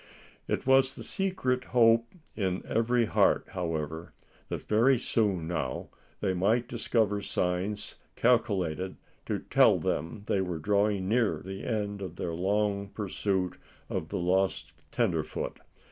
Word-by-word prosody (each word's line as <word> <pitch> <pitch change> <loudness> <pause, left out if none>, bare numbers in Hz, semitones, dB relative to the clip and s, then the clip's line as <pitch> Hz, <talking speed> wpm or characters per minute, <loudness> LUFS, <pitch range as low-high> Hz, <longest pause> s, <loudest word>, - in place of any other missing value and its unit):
It - - -1
was 135 0 +4
the - - -7
secret 130 -10 -1
hope 115 0 +6 0.3
of 95 -3 -1
every 115 +1 +2
heart, - - +3
however, 80 -1 -4 0.3
that - - -4
very 120 +5 +4
soon 100 -8 0
now 75 -7 -3 0.3
they 95 -3 +1
might 110 +7 +2
discover 110 -4 0
signs 95 +2 -2 0.2
calculated 95 -7 +1 0.3
to - - 0
tell - - +4
them 95 +6 -2
they 100 - +1
were 90 -3 -2
drawing 100 +3 +1
near 115 +1 +2
the 95 +1 -6
end 105 -2 -2
of 90 -3 -6
their 85 -1 -3
long 100 +3 0
pursuit 95 -3 -2 0.3
of 80 - -3
the 100 - -2
lost 90 -6 0 0.2
tenderfoot. - - -1
100 Hz, 130 wpm, -29 LUFS, 90-115 Hz, 0.3 s, hope